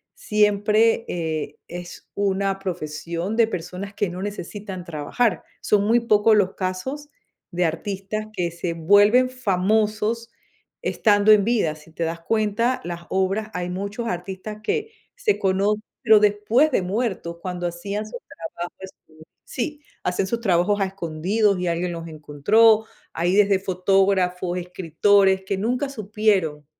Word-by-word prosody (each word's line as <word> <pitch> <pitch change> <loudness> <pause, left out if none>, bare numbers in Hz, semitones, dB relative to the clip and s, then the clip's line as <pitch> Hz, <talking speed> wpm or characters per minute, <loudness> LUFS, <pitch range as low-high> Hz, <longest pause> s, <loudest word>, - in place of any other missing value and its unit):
siempre, 210 +2 +2
eh, 160 -3 -3
es 175 0 -9
una 195 -1 0
profesión 170 +1 -4
de 230 -1 +5
personas 185 +1 -6
que 200 -2 -1
no 180 +2 -6
necesitan 200 -1 -6
trabajar. 170 +6 -1 0.2
Son 205 -1 +2
muy 230 +3 +4
pocos 220 -1 +4
los 190 -2 +2
casos 260 +11 -4 0.4
de 175 0 +1
artistas 195 +5 -3
que 175 -4 -1
se 170 0 -4
vuelven 205 +9 +5
famosos 215 0 0 0.5
estando 210 -1 +3
en 210 -1 +6
vida. 210 -10 +1
Si 155 +1 -17
te 165 - -4
das 165 +1 -3
cuenta, 225 +5 0
las 170 0 -5
obras 195 +3 0
hay 180 0 -3
muchos 200 +6 -4
artistas 190 +3 -5
que 440 - -1 0.2
se 470 -5 +1
cono 195 +2 +1 0.3
pero 220 -3 +7
después 210 +8 +3
de 220 - +2
muerto, 185 -4 -3
cuando 180 -1 -4
hacían 200 +5 -4
sus - - -7
trabajos 170 +1 -7
esco 160 -4 -14 0.2
Sí, 295 +4 -4 0.2
hacen 180 +2 0
sus 230 +3 -2
trabajos 195 0 +2
a - - +3
escondidos 190 +3 0
y 180 - -2
alguien 170 +1 -1
los 165 0 -6
encontró. 200 +9 +3 0.3
Hay 175 +3 +1
desde 200 -2 +4
fotógrafos, 185 -1 +1
escritores 190 +2 +2
que 195 - -1
nunca 250 +7 -1
supieron 200 - 0
195 Hz, 140 wpm, -23 LUFS, 175-215 Hz, 0.5 s, pero